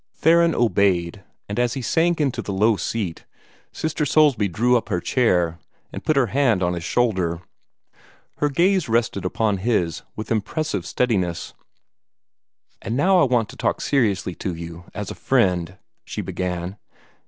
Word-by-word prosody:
Theron 170 +1 +4
obeyed, 100 -5 +1 0.2
and 100 +3 -3
as 120 -1 +1
he 135 - -4
sank 165 +6 +1
into 140 -4 0
the - - -5
low 105 +3 +3
seat, 100 -5 -4 0.5
Sister 160 -1 -2
Soulsby 145 -7 +3
drew 120 +8 +2
up 120 - -1
her 90 -5 0
chair, 90 -8 +1 0.3
and - - -6
put 155 - +1
her 135 -2 +4
hand 120 -9 +2
on 90 0 +1
his 85 -1 -5
shoulder. 90 -6 0 1.0
Her 145 - +1
gaze 175 +2 +2
rested 115 -5 0
upon 105 +2 0
his 95 -5 0
with 110 - -6
impressive 110 - -2
steadiness. 95 -7 -1 1.3
"And 115 - -3
now 185 +5 +4
I - - +5
want 120 -4 +1
to - - -11
talk - - -1
seriously 105 -9 0
to 90 -3 -2
you, 85 +1 -8
as 105 -1 -4
a - - -4
friend," 90 -8 +1 0.3
she - - -5
began. 90 +1 -4
110 Hz, 155 wpm, -22 LUFS, 90-135 Hz, 1.3 s, I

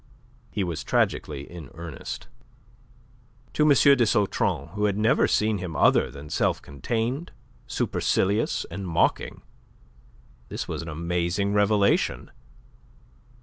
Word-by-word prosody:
He 100 - -2
was 85 -3 -3
tragically 75 -3 0
in 85 -6 -10
earnest. 80 -3 -7 1.3
To - - -1
M. - - +5
de 140 -2 +6
Sautron, 105 -6 +1
who 105 +4 -1
had 100 -1 +1
never 110 +2 +3
seen 105 -1 +1
him 90 -3 -5
other - - +4
than 70 +1 -10
self - - +1
contained, 115 - -3 0.4
supercilious, 100 +4 0
and 100 -1 -5
mocking, 85 -1 0 1.1
this - - -4
was - - -4
an 85 - -7
amazing 85 +5 -1
revelation. 105 0 +2
100 Hz, 115 wpm, -25 LUFS, 85-105 Hz, 1.3 s, de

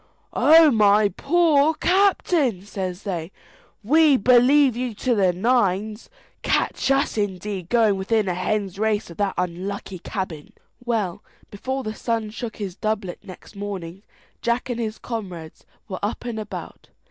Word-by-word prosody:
"Oh, 320 -1 +6
my 210 -2 +4
poor 315 - +2
captain," 345 - +2
says 190 -2 -5
they, 175 -4 -4 0.5
"we 300 +4 +5
believe 255 +3 +5
you 245 -2 -3
to 250 +4 0
the 195 -5 +3
nines. 210 +1 0 0.3
Catch - - 0
us, 270 -4 +1
indeed, 190 -2 -3
going 225 -4 +3
within 210 +2 0
a 180 - 0
hen's 195 +1 -2
race 215 -3 0
of 170 - -12
that 200 -2 -1
unlucky 185 +2 -4
cabin!" 175 -6 -6 0.3
Well, 220 -7 -2 0.3
before 260 +6 -4
the 215 - -4
sun 225 -1 -2
shook 230 0 -6
his 195 -4 -6
doublet 215 -4 -3
next 185 +2 -13
morning, 195 -3 -6 0.4
Jack 235 +2 -1
and 240 - -3
his 220 -2 -3
comrades 185 -9 -7 0.2
were 185 - -5
up 205 +4 -3
and 235 -2 -4
about. 210 -1 -8
215 Hz, 145 wpm, -23 LUFS, 190-245 Hz, 0.5 s, Oh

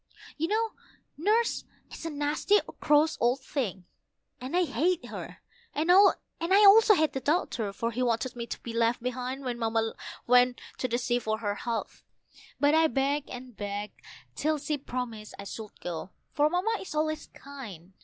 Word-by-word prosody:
But 325 - 0 0.7
Nurse 430 +9 +1 0.3
is 330 - -6
a - - -2
nasty 295 +7 +2 0.2
cross 300 +2 +3
old 245 +3 +2
thing 210 -10 -3 0.6
I 340 +9 +1
hate 355 +1 0
her; - - -8 0.3
and 320 +4 +2
I - - +8 0.5
hate 395 -1 +6
the 265 - -3
doctor, 270 - 0
for 230 +4 -2
he 240 +3 -3
wanted 245 +1 0
me 235 -1 -5
to - - -5
be 230 - -5
left 230 +1 +1
behind 255 +2 -3
When 245 -2 -3
Mamma 225 -1 0 0.3
went 245 0 +4 0.2
to 255 - 0
the 240 -1 0
sea 245 0 0
for 220 -2 -1
her 205 -2 -2
health; 230 +2 -4 0.6
but 290 +1 +4
I 320 0 +5
begged 280 +1 0
and 250 -1 -9
begged 205 0 -5 0.3
till 310 0 0
she 295 0 -2
promised 240 -5 -5
I 200 - -7
should 210 +1 -8
go, 175 0 -5 0.2
for 295 0 +3
Mamma 390 +6 0
is 370 - -7
always 310 0 -1
kind. 210 - -11
255 Hz, 165 wpm, -28 LUFS, 230-310 Hz, 0.7 s, I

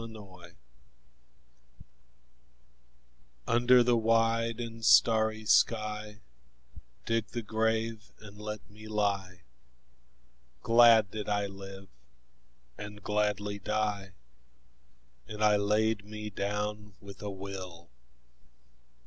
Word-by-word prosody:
Requiem 95 -6 -12 2.9
UNDER 120 +1 +5
the 120 0 +3
wide 115 0 +1
and 115 -1 -7
starry 110 -1 +4
sky 105 -1 +1 0.8
Dig 115 -1 0
the 120 -1 -5
grave 110 0 -1
and 105 -1 -13
let 105 0 -7
me 110 +1 -13
lie: 100 -4 -2 1.2
Glad 115 -3 +6
did 105 -1 -5
I 100 0 0
live 95 0 -10 0.9
and 105 0 -9
gladly 105 -1 -1
die, 105 -2 -2 1.1
And 105 0 -4
I 105 -1 +5
laid 105 +1 +1
me 105 0 -7
down 105 +1 -4
with 100 -1 -12
a 105 - -4
will. 95 -4 -8
105 Hz, 90 wpm, -30 LUFS, 100-110 Hz, 2.9 s, Glad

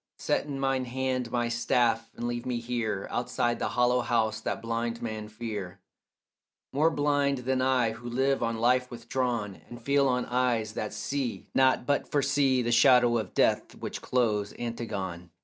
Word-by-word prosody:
Set - - 0
in 140 -2 -4
mine 135 -1 0
hand 130 0 -2
my 120 0 0
staff 115 -1 +1
and 120 - -3
leave 120 0 -3
me 125 -2 -2
here 115 -4 -2
Outside 120 0 -1
the - - 0
hollow 125 0 +2
house 110 -2 0
that - - -2
blind 115 0 -2
men 110 -2 -5
fear, 105 -4 -6 0.9
More 155 +4 +4
blind 145 -2 +1
than 130 0 +1
I 130 -3 +2
who 120 +2 -8
live 135 +3 +1
on 115 -1 -1
life 125 +2 +2
withdrawn 120 -4 -3
And 120 - -9
feel 140 +3 +2
on 125 -1 +1
eyes 120 -3 0
that 105 -1 -3
see 125 +3 -3
not 130 -2 +3
but 145 +1 0
foresee 140 -2 +2
The 120 - 0
shadow 120 0 +5
of 105 -5 -6
death - - +2
which - - -6
clothes 105 -5 0
Antigone. 100 -7 -4
120 Hz, 165 wpm, -28 LUFS, 115-130 Hz, 0.9 s, shadow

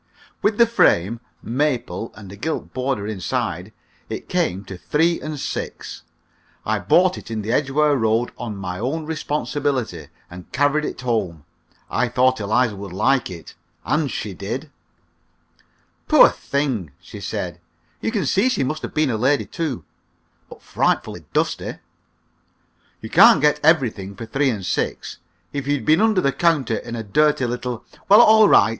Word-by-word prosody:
With 210 0 +1
the 235 - +7
frame 115 - +2 0.2
(maple, 125 -2 -2
and 100 -4 -11
a - - -9
gilt 155 +10 -4
border 130 -5 -2
inside) 105 -4 -3 0.4
it - - -6
came 95 +3 -1
to 95 - -8
three 165 - 0
and 155 -1 -5
six. - - -5 0.6
I 110 0 0
bought 180 - +3
it - - -13
in 110 -2 -3
the 110 - -2
Edgware 145 +3 +2
Road 115 -1 +1
on 115 -4 -6
my 90 -2 -5
own 145 +8 -2
responsibility, 145 -4 -2 0.2
and 90 0 -12
carried 145 +2 +1
it - - -5
home. 100 - -2 0.4
I 125 +2 0
thought 130 +1 +2
Eliza 110 +2 +1
would 100 -1 -8
like 115 +6 +1
it, 85 -3 -10 0.3
and 150 -1 +1
she 105 -4 -4
did. 120 - -5 1.4
"Poor - - +7
thing!" 130 - -2
she - - -11
said. 85 -1 -5 0.4
"You - - -1
can 220 -4 -1
see 205 +7 +2
she 195 - 0
must 155 +4 -3
have - - -7
been 150 -3 +2
a 110 - -1
lady, 135 +6 +2
too. 160 -8 -4 0.7
But - - -13
frightfully - - -1
dusty!" - - -1 1.3
"You - - -8
can't - - +7
get 150 +1 +3
everything 120 - +2
for 115 - -7
three 135 +5 +1
and 105 -6 -3
six. - - -3 0.3
If 140 -1 -4
you'd 145 -5 0
been 155 +6 +4
under 220 -4 +3
the 140 - +2
counter 150 -10 +1
in 120 +2 -6
a 115 - -4
dirty 145 +5 +2
little 120 0 -4
" - - -28
"Well, 205 - +9
all 220 -2 +7
right! - - +6
130 Hz, 165 wpm, -21 LUFS, 110-150 Hz, 1.4 s, Well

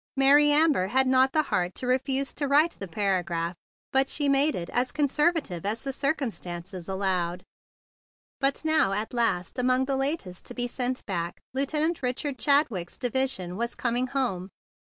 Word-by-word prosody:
Mary 285 +2 +6
Amber 295 - +4
had 265 +6 +3
not 260 0 +4
the 310 +1 +2
heart 180 -7 -1
to - - -4
refuse 265 +2 0
to 285 - -2
write 300 +4 +4
the 195 - -8
para¬ 190 0 0
graph, 170 0 -3 0.4
but 270 0 +3
she 290 -1 0
made 280 +2 +3
it 170 -1 -4
as 250 +1 0
conservative 295 - 0
as 215 +4 -2
the 270 -1 -3
circumstances 195 - -3
allowed. 185 -2 -1 1.0
But 275 +3 0
now, 315 -11 +3
at 210 +4 -3
last, 230 -5 0
among 255 +1 +2
the 270 0 -1
latest 270 - -3
to - - -7
be 245 - 0
sent 250 +1 -3
back, 175 -3 -3
Lieutenant 300 +5 0
Richard 255 +1 -3
Chadwick's 240 - +1
division 245 -8 -1
was 235 +1 -2
coming 245 +1 0
home! 240 -9 -2
255 Hz, 165 wpm, -27 LUFS, 190-275 Hz, 1.0 s, Mary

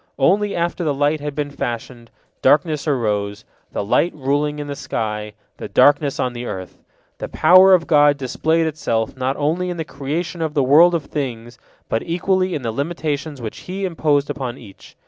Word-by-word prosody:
Only 200 +9 +2
after 170 +1 -1
the 150 -3 0
light 145 +2 +1
had 145 -1 -5
been 145 -1 -3
fashioned, 120 -2 -5 0.3
darkness 150 +2 +2
arose, 105 -7 -1 0.3
the - - -3
light 170 - +2
ruling 145 +1 -1
in 145 - -5
the 145 0 -5
sky, 105 -4 -4 0.2
the - - -6
darkness 145 -1 +3
on 125 - -1
the 120 0 -6
earth. 95 -6 -7 0.4
The - - -5
power 185 +1 +7
of 170 -2 -1
God 145 -2 +4
displayed 160 +5 0
itself 115 -8 -2
not 130 +1 -2
only 165 +5 0
in 175 - -4
the 160 - -3
creation 155 +6 -4
of 160 -1 -2
the 140 - +3
world 165 +7 +6
of 160 -4 -2
things, 120 -4 -5 0.3
but 115 - -1
equally 185 +2 0
in 140 - -4
the 115 - -1
limitations 145 0 -3
which 110 - -6
He 195 +1 -3
imposed 150 -5 0
upon 130 -3 -5
each. 105 -7 -15
145 Hz, 185 wpm, -20 LUFS, 125-165 Hz, 0.4 s, power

